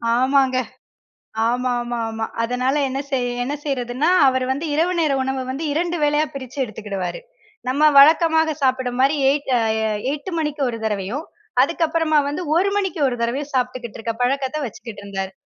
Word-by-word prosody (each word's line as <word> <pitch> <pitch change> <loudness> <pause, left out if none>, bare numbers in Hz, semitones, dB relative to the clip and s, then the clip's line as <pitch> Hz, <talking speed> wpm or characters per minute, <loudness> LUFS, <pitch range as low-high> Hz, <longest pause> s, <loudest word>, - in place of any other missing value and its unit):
ஆமாங்க. 260 +1 +3 0.9
ஆமா, 250 +1 0
ஆமா, 240 0 -4
ஆமா. 225 0 -3 0.2
அதனால 250 +3 0
என்ன 265 +1 -3
செய்ய 250 -2 0
என்ன 275 - -3
செய்யிறதுன்னா, 260 +1 -1 0.2
அவர் 260 -1 +1
வந்து 280 +5 -2
இரவு 340 +4 +2
நேர 310 -3 +2
உணவ 265 0 -2
வந்து 275 +5 -4
இரண்டு 345 +3 -1
வேளையா 295 +1 +3
பிரிச்சி 265 0 -8
எடுத்துக்கிடுவாரு. 205 - -5 0.5
நம்ம 280 +4 +1 0.2
வழக்கமாக 320 +1 +5
சாப்பிட்றமாரி 260 +2 +2
எயிட் 280 0 -1
அ - - +1 0.5
8:00 300 +6 -5
மணிக்கு 300 -2 -2
ஒரு 230 - -4
தடவையும், 215 - -2 0.4
அதுக்கப்புறமா 325 0 +1
வந்து 290 +5 -3
1:00 375 +4 +3
மணிக்கு 380 -5 -1
ஒரு 245 -2 -2
தடவையும் 270 +5 -2
சாப்பிட்டுக்கிட்டுருக்க 245 -3 -2
பழக்கத்த 265 +3 0
வச்சுக்கிட்டுருந்தாரு. 200 -4 -6
265 Hz, 145 wpm, -21 LUFS, 245-300 Hz, 0.9 s, வழக்கமாக